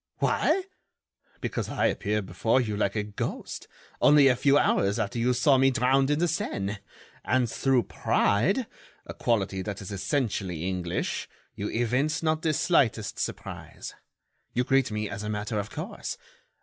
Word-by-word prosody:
"Why? 385 - +2 0.8
Because - - -3
I - - 0
appear 105 0 0
before 95 +7 +1
you 110 -5 -1
like 100 0 0
a 105 - 0
ghost, 105 -1 -5 0.3
only 145 -2 +7
a 125 - +3
few 140 +3 +4
hours 100 -7 +2
after 115 +2 -2
you 120 +2 +2
saw 130 +2 +4
me 135 0 +5
drowned 135 +2 +2
in 145 - +2
the 175 +2 +2
Seine; 100 -10 -2 0.5
and 125 0 +2
through 130 +1 +2
pride—a 195 - -1
quality 100 -5 0
that 100 0 -5
is 100 0 -8
essentially 100 - -2
English—you 90 +2 -4
evince 125 +8 0
not 155 0 +1
the 160 - +1
slightest 115 - +1
surprise. - - -6 0.6
You 125 - +1
greet 135 0 +2
me 105 0 -2
as 100 0 -6
a 105 - -4
matter 105 +1 -2
of 100 +1 -4
course. - - -5
115 Hz, 150 wpm, -27 LUFS, 100-135 Hz, 0.8 s, only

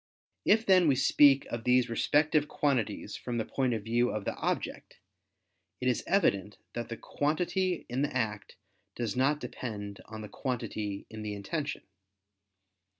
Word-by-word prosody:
If 220 +2 +4
then 185 -3 +6
we 140 - +4
speak 140 +1 +5
of 120 -1 -3
these 125 0 +4
respective 150 +5 +2
quantities 135 -9 -1
from 120 -1 -4
the 110 - -1
point 130 -3 0
of 110 - -4
view 120 +2 +2
of 110 -2 -3
the - - -1
object, - - -3 0.8
it 125 - -1
is 125 - +1
evident 105 - +2 0.2
that 120 -1 -4
the 115 - -5
quantity 175 +4 -1
in 125 +2 -2
the 145 - 0
act 105 -4 -3 0.4
does 115 -4 -2
not 140 +4 +2
depend 105 -6 -6
on 110 0 -8
the 105 - -6
quantity 110 -5 -4
in 110 0 -7
the 105 -1 -4
intention. 145 +9 -3
125 Hz, 155 wpm, -30 LUFS, 110-145 Hz, 0.8 s, then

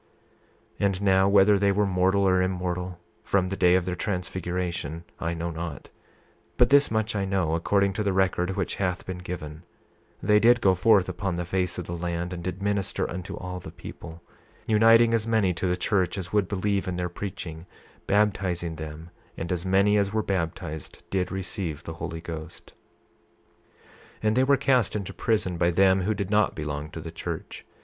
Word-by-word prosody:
28:17 - - +2
And 95 -1 -2
now, 95 0 +4
whether 100 0 +5
they 100 0 +3
were 105 +1 +2
mortal 95 +1 +2
or 95 0 +3
immortal, 90 -1 -2 0.3
from 95 -2 +1
the 95 - -2
day 90 -1 +4
of 95 -1 +1
their 90 - -2
transfiguration, 90 -4 -3 0.2
I 85 +1 -2
know 85 +1 -3
not; 80 -3 -6 0.6
28:18 - - -37
But - - +5
this 140 0 +6
much 110 0 -1
I 100 - 0
know, 95 -4 0
according 100 +4 +2
to 105 - -2
the 100 - +1
record 95 -1 +1
which 95 -2 -2
hath 90 -1 -1
been 95 -1 -5
given—they 90 +4 -3
did 120 +2 +5
go 95 -4 +4
forth 95 +1 +4
upon 95 0 -3
the 85 0 -3
face 90 +1 -1
of 90 - -4
the 85 - -5
land, 85 +1 -3
and 85 -1 -6
did 95 +2 -4
minister 100 -2 0
unto 90 +1 -6
all 90 0 -5
the 85 - -9
people, 85 0 -10 0.4
uniting 115 +1 +5
as 115 -1 +1
many 110 -5 +2
to 90 +2 -2
the 90 0 0
church 90 -1 0
as 95 0 -6
would 105 -3 +2
believe 100 0 -1
in 90 - -2
their 90 0 -1
preaching; 85 -2 -7 0.4
baptizing 95 -5 +1
them, 80 +2 -8 0.3
and 85 - -4
as 90 +1 -2
many 100 +2 +4
as 100 0 0
were 110 0 0
baptized 85 -5 -4
did 95 -2 0
receive 90 -4 -4
the 80 - -6
Holy 80 0 -6
Ghost. 80 -2 -8 1.0
28:19 - - -31 0.4
And 110 0 +2
they 130 - +4
were 140 +1 +4
cast 130 -7 +2
into 100 -3 -4
prison 105 -6 0
by 85 - +3
them 95 +2 +4
who 105 +4 0
did 100 0 -3
not 105 -1 +3
belong 75 0 -4
to 80 - -8
the 80 +1 -7
church. 85 - -6
95 Hz, 190 wpm, -26 LUFS, 85-100 Hz, 1.0 s, this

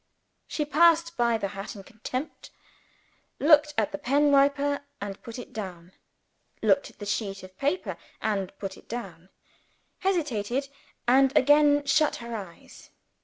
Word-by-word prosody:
She 300 - -2
passed 335 +2 +4
by 235 -1 +2
the 200 -2 -3
hat 195 +2 -7
in 200 - -10
contempt; 255 +8 -6 0.9
looked 300 0 +5
at 215 -2 +1
the 195 - -5
pen 285 +3 +3
wiper, 280 +1 +3 0.2
and 200 -1 -6
put 230 0 -8
it 245 - -9
down; 180 -4 -7 0.7
looked 280 - +3
at - - -21
the 205 - -7
sheet 200 -2 -3
of 185 0 -12
paper, 290 +7 -1 0.2
and 195 -3 -1
put 195 -1 -6
it - - -19
down; 190 -7 -7 0.7
hesitated 275 - -1 0.4
and 265 +2 +5
again 290 +1 +5
shut 300 +2 +3
her 235 0 -6
eyes. 190 -6 -10
245 Hz, 145 wpm, -27 LUFS, 200-290 Hz, 0.9 s, looked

